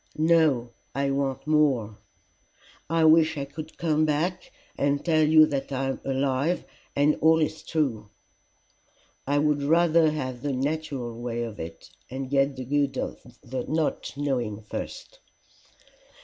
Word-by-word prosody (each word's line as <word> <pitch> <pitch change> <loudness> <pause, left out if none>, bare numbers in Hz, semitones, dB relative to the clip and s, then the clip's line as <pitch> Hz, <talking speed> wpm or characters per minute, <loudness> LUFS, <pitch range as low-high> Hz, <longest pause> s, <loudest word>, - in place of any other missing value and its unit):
"No. 155 -7 +3 0.2
I 140 0 0
want 135 -1 -2
more." 135 -9 +1 0.9
"I 165 0 +3
wish 160 0 +5
I 140 - -2
could 155 +3 -9
come 155 -2 +1
back 165 - -1 0.2
and 140 0 0
tell 160 -2 +3
you 155 0 +7
that 140 -2 -3
I 135 0 -1
am 135 - -4
alive 135 +4 0 0.3
and 145 +2 +3
all 160 +1 +5
is 155 0 -1
true." 130 -10 -2 1.2
"I 145 +1 +2
would 150 0 +2
rather 165 +2 +4
have 130 -5 -4
the 145 0 -2
natural 135 -4 -3
way 120 -1 -2
of 110 -3 -7
it, 80 0 -8 0.2
and 130 +1 -5
get 140 0 +2
the 130 - -6
good 140 0 0
of - - -4 0.5
not 155 -2 -1
knowing 120 -7 -2
first." 105 - -7
145 Hz, 140 wpm, -26 LUFS, 130-155 Hz, 1.2 s, you